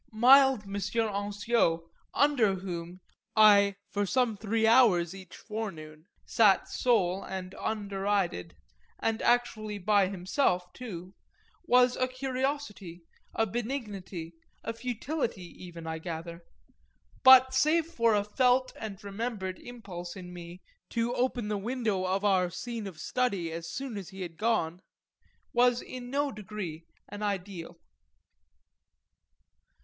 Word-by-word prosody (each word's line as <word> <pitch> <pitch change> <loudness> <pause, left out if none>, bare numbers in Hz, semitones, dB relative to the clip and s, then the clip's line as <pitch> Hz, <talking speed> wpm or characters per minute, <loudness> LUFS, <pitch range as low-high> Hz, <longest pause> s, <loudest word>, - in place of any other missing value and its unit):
Mild 260 +1 +6
M. 195 -1 -9
Ansiot, 205 -3 0 0.3
"under" 250 -9 +3
whom 180 -1 -6 0.3
I 200 -2 +6 0.2
for 205 -1 -1
some 245 0 +1
three 220 +2 0
hours 215 -8 +5
each 190 -2 -11
forenoon 165 -8 -7 0.2
sat 210 -4 +4
sole 195 -6 +1
and 185 -1 -6
underided 200 - -2 0.4
and 225 0 -1
actually 220 -3 +1
by 200 0 +3
himself 180 -1 0
too 185 -7 -8 0.5
was 250 -2 +4
a 255 - +1
curiosity, 255 - -4 0.3
a 225 - +2
benignity, 205 -7 -5 0.3
a 230 - -3
futility 240 - -3 0.2
even, 170 -2 -9
I 160 0 -4
gather; 170 0 -7 0.8
but 260 0 +8
save 305 +5 +3
for 230 -9 +2
a 205 - +2
felt 255 +4 +2
and 215 -3 -6
remembered 200 -2 -4
impulse 185 -8 -8
in 180 -2 -9
me 175 +1 -10 0.3
to 235 +1 -1
open 245 -3 -1
the 210 -1 -1
window 215 -4 -1
of 190 +2 0
our 185 -3 +3
scene 230 +3 -5
of 175 -5 -10
study 195 -5 -1
as 165 +1 -6
soon 265 -3 -5
as 190 -2 -9
he 190 -1 -7
had 165 -2 -8
gone 180 -6 0 0.7
was 245 0 +4
in 250 -1 -8
no 285 +1 0
degree 190 -6 -7 0.2
an 205 - -8
ideal. 190 -4 -4
205 Hz, 125 wpm, -29 LUFS, 185-240 Hz, 0.8 s, but